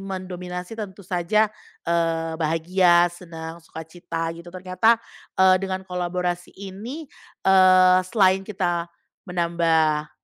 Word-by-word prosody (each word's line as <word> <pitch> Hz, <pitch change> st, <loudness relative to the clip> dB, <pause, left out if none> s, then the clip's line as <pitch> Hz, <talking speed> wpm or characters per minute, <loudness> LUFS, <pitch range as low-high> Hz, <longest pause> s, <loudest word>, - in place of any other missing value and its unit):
mendominasi 180 Hz, -1 st, -6 dB
tentu 200 Hz, -3 st, -8 dB
saja, 190 Hz, +4 st, +1 dB, 0.4 s
eee, 165 Hz, -1 st, 0 dB
bahagia, 175 Hz, +2 st, +3 dB
senang, 165 Hz, -1 st, -9 dB
suka 160 Hz, 0 st, -10 dB
cita 165 Hz, 0 st, -5 dB
gitu. 170 Hz, +1 st, -11 dB
Ternyata, 185 Hz, +5 st, +2 dB, 0.4 s
eee, 190 Hz, 0 st, +6 dB
dengan 190 Hz, -1 st, -4 dB
kolaborasi 180 Hz, -1 st, -3 dB
ini, 205 Hz, +11 st, -8 dB, 0.4 s
eee, 185 Hz, -1 st, +6 dB
selain 190 Hz, -3 st, +3 dB
kita 175 Hz, -4 st, -2 dB, 0.4 s
menambah, 165 Hz, -3 st, +1 dB
180 Hz, 105 wpm, -23 LUFS, 170-190 Hz, 0.4 s, eee